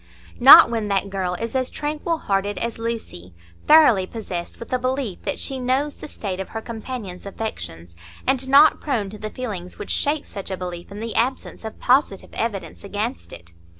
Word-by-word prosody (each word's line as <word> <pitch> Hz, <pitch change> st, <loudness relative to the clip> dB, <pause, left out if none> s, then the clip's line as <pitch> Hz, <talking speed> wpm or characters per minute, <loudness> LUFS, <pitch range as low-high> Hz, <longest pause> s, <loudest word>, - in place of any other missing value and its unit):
Not -, -, +10 dB
when 225 Hz, -3 st, -1 dB
that 200 Hz, 0 st, 0 dB
girl 185 Hz, -2 st, -2 dB
is 230 Hz, +6 st, -5 dB
as 260 Hz, -1 st, 0 dB
tranquil 305 Hz, +3 st, -2 dB
hearted 200 Hz, -5 st, -1 dB
as 230 Hz, -1 st, -3 dB
Lucy, 225 Hz, -, -5 dB, 0.3 s
thoroughly 270 Hz, -12 st, +6 dB
possessed 185 Hz, -6 st, -6 dB
with 230 Hz, -, -8 dB
a 255 Hz, -, +2 dB
belief 255 Hz, -6 st, -2 dB
that -, -, -2 dB
she 265 Hz, -1 st, -2 dB
knows 265 Hz, +4 st, 0 dB
the -, -, -10 dB
state 195 Hz, -9 st, -5 dB
of 190 Hz, -, -5 dB
her 225 Hz, -, -5 dB
companions' 220 Hz, -5 st, -7 dB
affections, 85 Hz, -, -6 dB, 0.3 s
and 265 Hz, 0 st, +1 dB
not 285 Hz, +3 st, +6 dB
prone 225 Hz, -9 st, -1 dB
to 210 Hz, -, -10 dB
the 215 Hz, -, -5 dB
feelings 200 Hz, -8 st, -6 dB
which -, -, -5 dB
shake 290 Hz, +1 st, 0 dB
such 195 Hz, -, -7 dB
a 190 Hz, -, -3 dB
belief 180 Hz, 0 st, -7 dB
in 205 Hz, +2 st, -7 dB
the 230 Hz, 0 st, -4 dB
absence 255 Hz, +1 st, -1 dB
of 220 Hz, -, -7 dB
positive 250 Hz, -6 st, +1 dB
evidence 215 Hz, -4 st, -4 dB
against 210 Hz, +5 st, -4 dB
it. 85 Hz, 0 st, -12 dB
220 Hz, 185 wpm, -22 LUFS, 190-255 Hz, 0.3 s, Not